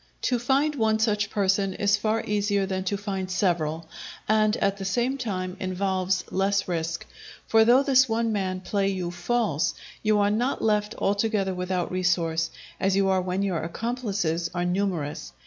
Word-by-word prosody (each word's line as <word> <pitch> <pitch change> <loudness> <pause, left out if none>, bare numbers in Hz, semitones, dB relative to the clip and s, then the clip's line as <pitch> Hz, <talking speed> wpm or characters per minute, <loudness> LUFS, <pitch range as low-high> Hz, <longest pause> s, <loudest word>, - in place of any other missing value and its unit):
To 250 -2 +1
find 275 +5 +2
one 220 -5 +2
such 210 -2 +1
person 195 -1 +1
is 200 0 +3
far 220 +1 0
easier 205 -1 +1
than 190 -1 -2
to 200 +2 0
find 195 -2 -4
several, 165 -4 0 0.4
and, 215 0 +3
at 200 0 0
the 195 - -6
same 240 +7 0
time, 185 -8 -3
involves 185 0 -1
less 195 0 +1
risk; 165 -1 -2 0.4
for 225 0 +5
though 250 +4 +6
this 260 -2 +4
one 225 0 +1
man 185 -2 -2
play 195 +1 0
you 185 -3 -2
false, 180 -3 0 0.3
you 215 -1 +2
are 205 0 +3
not 240 +5 0
left 210 0 +1
altogether 200 -1 0
without 180 -1 -2
resource, 170 -3 +1 0.3
as 195 0 +2
you 195 0 +3
are 190 -1 +2
when 185 +2 -1
your 185 -5 -1
accomplices 195 -4 -2
are 175 0 0
numerous. 180 -5 -2
195 Hz, 165 wpm, -26 LUFS, 185-215 Hz, 0.4 s, though